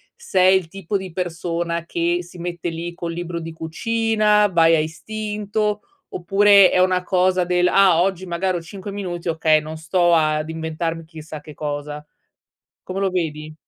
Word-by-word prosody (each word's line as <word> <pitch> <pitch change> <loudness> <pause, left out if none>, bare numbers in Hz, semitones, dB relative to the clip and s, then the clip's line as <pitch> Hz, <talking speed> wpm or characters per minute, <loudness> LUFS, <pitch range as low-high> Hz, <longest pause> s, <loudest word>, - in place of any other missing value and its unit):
sei 190 - +3
il 185 -3 -4
tipo 195 +1 -5
di 190 -1 -7
persona 170 -1 -3
che 170 +1 0
si 175 +1 -13
mette 175 0 -4
lì 170 +1 -5
col 170 -1 -5
libro 175 0 -4
di 165 0 -6
cucina, 210 +5 +1
vai 165 -3 +4
a - - +2
istinto, 210 +5 -3 0.3
oppure 195 +1 +5
è - - +2
una 185 0 +3
cosa 185 0 +2
del: 180 0 +2
"Ah, 185 -3 +5
oggi 190 0 -1
magari 180 +1 -1
ho - - -6
5 190 +4 -8
minuti, 180 -4 -5
okay, 160 -1 +3
non 155 +1 -7
sto 175 +2 +2
ad 155 -1 +2
inventarmi 160 +1 -4
chissà 155 -1 -10
che 150 0 -12
cosa." 150 0 -5 0.8
Come 185 +1 -5
lo 195 - +2
vedi? 155 -4 -3
175 Hz, 165 wpm, -21 LUFS, 160-190 Hz, 0.8 s, oppure